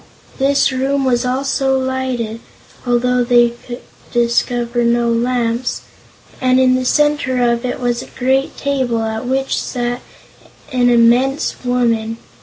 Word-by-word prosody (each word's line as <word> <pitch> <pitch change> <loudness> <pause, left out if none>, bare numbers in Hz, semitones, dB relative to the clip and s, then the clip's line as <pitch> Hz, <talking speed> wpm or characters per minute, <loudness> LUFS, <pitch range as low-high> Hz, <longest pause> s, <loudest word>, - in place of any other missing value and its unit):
This 275 +1 +2
room 270 +1 0
was 250 -1 +1
also 270 +1 0
lighted, 260 -4 -3 0.5
although 245 +1 +2
they 240 -1 +4
could 240 +1 -10 0.3
discover 240 0 0
no 235 0 +2
lamps, 240 0 -1 0.6
and 255 0 +3
in 255 -1 +4
the 255 0 0
center 295 -2 +1
of 235 +1 -2
it 245 - -3
was 240 -1 -1
a - - -10
great 265 +2 -1
table 260 -5 -1
at 220 +2 -4
which 270 +1 -1
sat 245 0 -3 0.7
an 245 -1 +3
immense 245 +4 +3
woman. 230 -3 0
245 Hz, 130 wpm, -17 LUFS, 235-260 Hz, 0.7 s, they